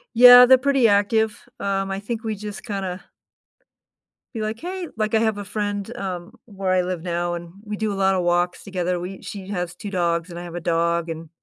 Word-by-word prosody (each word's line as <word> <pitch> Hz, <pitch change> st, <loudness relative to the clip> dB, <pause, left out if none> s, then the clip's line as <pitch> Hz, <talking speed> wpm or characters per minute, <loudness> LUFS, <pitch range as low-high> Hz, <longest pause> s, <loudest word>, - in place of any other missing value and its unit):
Yeah, 245 Hz, +1 st, +10 dB
they're 260 Hz, +1 st, +7 dB
pretty 270 Hz, -2 st, +3 dB
active. 210 Hz, +1 st, +1 dB
Um, 195 Hz, -1 st, -1 dB
I 195 Hz, -, -2 dB
think, 225 Hz, +3 st, -5 dB
we 220 Hz, -1 st, -2 dB
just 210 Hz, 0 st, -8 dB
kinda 195 Hz, -4 st, -4 dB, 1.3 s
be 225 Hz, -, -3 dB
like, 215 Hz, +1 st, -3 dB
"Hey" 365 Hz, +1 st, -5 dB
Like, 215 Hz, 0 st, 0 dB
I -, -, +4 dB
have 220 Hz, -2 st, +1 dB
a -, -, -4 dB
friend, 205 Hz, +2 st, -3 dB
um, 185 Hz, +1 st, -5 dB
where 195 Hz, -4 st, -3 dB
I 185 Hz, 0 st, +3 dB
live 180 Hz, -1 st, -3 dB
now, 175 Hz, 0 st, -2 dB
and 170 Hz, 0 st, -8 dB
we 210 Hz, -1 st, -5 dB
do 215 Hz, 0 st, -1 dB
a -, -, -4 dB
lot 195 Hz, 0 st, +2 dB
of 180 Hz, -, 0 dB
walks 175 Hz, +1 st, 0 dB
together. 180 Hz, -2 st, -2 dB
We 185 Hz, +2 st, -7 dB
She 195 Hz, -2 st, -7 dB
has 180 Hz, -4 st, -3 dB
2 210 Hz, -, -7 dB
dogs, 170 Hz, -2 st, 0 dB
and 170 Hz, -, -8 dB
I -, -, -7 dB
have 175 Hz, -1 st, -8 dB
a -, -, -2 dB
dog 170 Hz, 0 st, 0 dB
and 165 Hz, 0 st, -6 dB
195 Hz, 220 wpm, -23 LUFS, 175-220 Hz, 1.3 s, Yeah